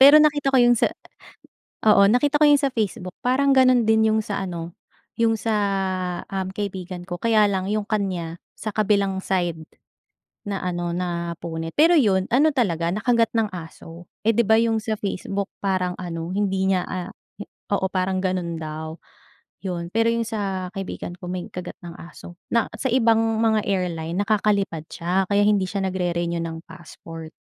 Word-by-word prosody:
pero 280 +3 +10
nakita 300 -2 +4
ko 270 - +3
yung 240 -1 +6
sa, 240 - +3 1.0
oo 200 -2 +7
nakita 290 +4 +3
ko 300 - +4
'yong 290 -1 +6
sa 275 - +2
Facebook 200 -7 -3
parang 270 +2 +3
gano'n 255 -3 +5
din 220 0 +4
yung 220 - +2
sa 205 -2 -3
ano 170 -2 -6 0.4
yung 230 -1 +3
sa, 220 +1 -3 0.8
um, 190 -1 -2
kaibigan 185 -3 -5
ko, 175 - -3
kaya 215 +1 +3
lang 190 -1 -1
'yong 210 -1 -2
kanya 185 -6 -2 0.2
sa 220 - -7
kabilang 200 -2 +1
side 175 -3 0 0.9
naano 180 -3 -2
napunit. 170 -2 -4
Pero 330 +3 +6
'yon 195 - +3
ano, 280 +7 +4
talaga 175 - 0
nakagat 230 +4 +2
ng 220 - +3
aso, 165 0 -10 0.2
eh, 225 - +4
'di 235 - +4
ba 220 +1 +4
yung 225 -1 +1
sa 215 0 -2
Facebook 200 0 -3 0.2
parang 185 -2 0
ano 175 0 -5
hindi 195 -2 0
niya, 190 -2 +2
ah, 180 0 -5 0.6
oo 195 -1 +1
parang 185 0 0
gano'n 185 -3 -2
daw 155 +1 -6 0.6
'yon 175 -3 -4
pero 225 +1 +3
yung 230 0 +1
sa 195 -4 -3
kaibigan 195 -3 -5
ko 180 - -8
may 180 -1 -3
kagat 180 -1 -7
ng 170 - -7
aso 175 +1 -11 0.2
na 230 -2 +2
sa 265 - 0
ibang 230 -2 +4 0.2
mga 220 -1 +3
airline 175 -4 -2
nakakalipad 200 -5 0
siya 180 +2 -1
kaya 205 0 +3
hindi 205 -2 +3
siya 195 +1 -3
nag-re-renew 175 -2 -1
ng 165 0 -5
passport. 165 -2 -11
195 Hz, 165 wpm, -23 LUFS, 175-220 Hz, 1.0 s, pero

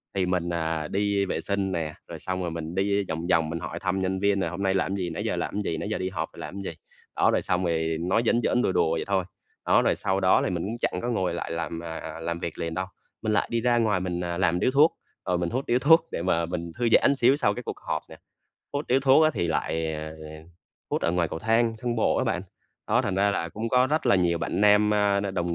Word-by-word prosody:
thì 95 - +1
mình, 90 -1 -1
à, 80 -2 -2
đi 100 0 0
vệ 95 - -2
sinh 100 -1 -1
nè, 80 -3 -2
rồi - - -8
xong 95 0 -3
rồi 85 -2 -2
mình 80 +1 -5
đi 100 +1 +1
vòng 80 +2 -3
vòng 80 -3 +2
mình 85 0 -3
hỏi - - -5
thăm 95 0 -1
nhân 95 0 -1
viên 100 0 +2
là 85 - 0
"Hôm 90 +4 -5
nay 95 -1 +2
làm 95 +1 0
gì? 90 -3 -2
Nãy - - -4
giờ - - -1
làm 105 - -2
gì? 80 -5 -2
Nãy 100 - -4
giờ 110 - -1
đi 95 0 -2
họp 80 -3 -4
rồi - - -13
làm 100 +2 -6
gì?" 95 - -4 0.4
Đó, - - +3
rồi - - +1
xong 90 0 0
ì 80 -1 0
nói 90 +8 +1
giỡn 120 +1 +3
giỡn, 125 - +2
đùa 95 - +1
đùa 80 - +2
vậy 80 - -1
thôi. 95 -2 +1 0.4
Đó, - - +4
rồi - - +2
sau 95 0 0
đó 95 -1 +4
thì - - 0
mình 85 -2 -2
cũng 115 +3 -4
chẳng 90 - -1
có 120 - -2
ngồi 95 -7 0
lại 85 - -4
làm, 85 0 -3
à, 80 -1 -6
làm 85 +1 -3
việc 85 - -5
liền 85 -1 -3
đâu. 95 +2 -2 0.4
Mình 110 -1 0
lại - - +1
đi 115 -1 0
ra 120 0 +3
ngoài 105 -5 +2
mình, 90 -1 -3
à, 85 0 -3
làm 90 -1 +2
điếu 130 - +2
thuốc, 150 +4 +4 0.3
rồi 90 -2 +1
mình 85 -1 -1
hút 130 +3 -2
điếu 120 +1 +2
thuốc 160 +3 +5
để - - -3
mà 85 -2 +1
mình 85 -1 -4
thư 120 -1 +1
giãn - - +6
một - - +1
xíu 130 +2 +4
sau 105 -8 +1
cái - - -6
cuộc - - -6
họp - - -3
nè. - - -11 0.6
Hút 145 +1 -3
điếu 130 +2 +3
thuốc 135 +3 +5
á 155 - +4
thì 85 - 0
lại, 80 0 -1
ờ, 80 0 -5
ờ, 80 - -11 0.7
hút - - -1
ở 85 - +1
ngoài 85 -2 +1
cầu - - -5
thang, 115 +3 +2
thang 120 0 -2
bộ 110 - +2
á - - +1
bạn. - - -1 0.4
Đó, - - +2
thành 95 - -1
ra 100 +1 +3
là 85 -4 -2
cũng 110 +7 -4
có 125 +2 +4
rất 150 0 0
là 120 - +5
nhiều 85 -2 +2
bạn 95 - -2
nam, 105 0 +5
a, 100 -1 +2
n 100 -1 -3
đồng 85 -2 -1
95 Hz, 285 wpm, -26 LUFS, 85-105 Hz, 0.7 s, giãn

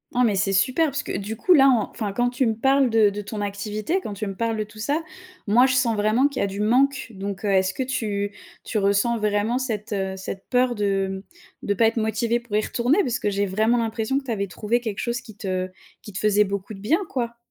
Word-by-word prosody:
Non 250 - +4
mais 210 -4 +3
c'est 195 +1 +1
super 255 - +3
parce 285 +1 -3
que, - - -6
heu, - - -1
du 210 +3 -5
coup 360 - +4
là 275 -3 +7 0.2
enfin, 210 -4 -4
quand 245 +3 +1
tu 250 +1 0
me 225 -2 +1
parles 270 +2 +3
de 220 -2 +4
de 205 +1 -5
ton 205 +1 -6
activité, 210 - -2
quand 210 - -5
tu 200 +2 -4
me 195 -2 -5
parles 230 0 -1
de 215 - -1
tout 210 +1 -15
ça, 290 +8 0 0.5
moi 240 +5 +5
je 260 - +2
sens 235 -4 +2
vraiment 215 +6 +3
qu'il 270 - -5
y - - +2
a - - +1
du 200 +2 -4
manque, 265 +5 +2
donc 195 0 -5
heu, 205 - 0
est-ce 190 -1 +2
que 260 - -2
tu 210 -6 -2 0.3
tu 225 - -3
ressens 200 +4 +2
vraiment 210 +2 0
cette, 220 -5 -3
heu, 190 -1 -1
cette 190 0 -7
peur 250 -1 +2
de 195 -2 -1 0.4
mmh, - - -7
de 205 - +2
pas 225 +2 +4
être 230 - -1
motivée 225 +2 0
pour 235 -3 -6
y 215 - +3
retourner? 250 - +1
Parce 250 0 -1
que 210 - 0
j'ai 200 0 0
vraiment 215 +5 +2
l'impression 225 +2 -1
que 280 - -2
tu 250 - -5
avais 200 -2 -1
trouvée, 220 +6 -1
quelque 220 -5 -4
chose 240 0 -1
qui 225 -5 -13
te 185 -3 -3 0.3
qui 210 - -11
te 185 - -4
faisait 210 0 +3
beaucoup 200 +1 -4
de 195 - -10
bien 270 - +2
quoi? 235 -2 -3
220 Hz, 260 wpm, -23 LUFS, 200-245 Hz, 0.5 s, là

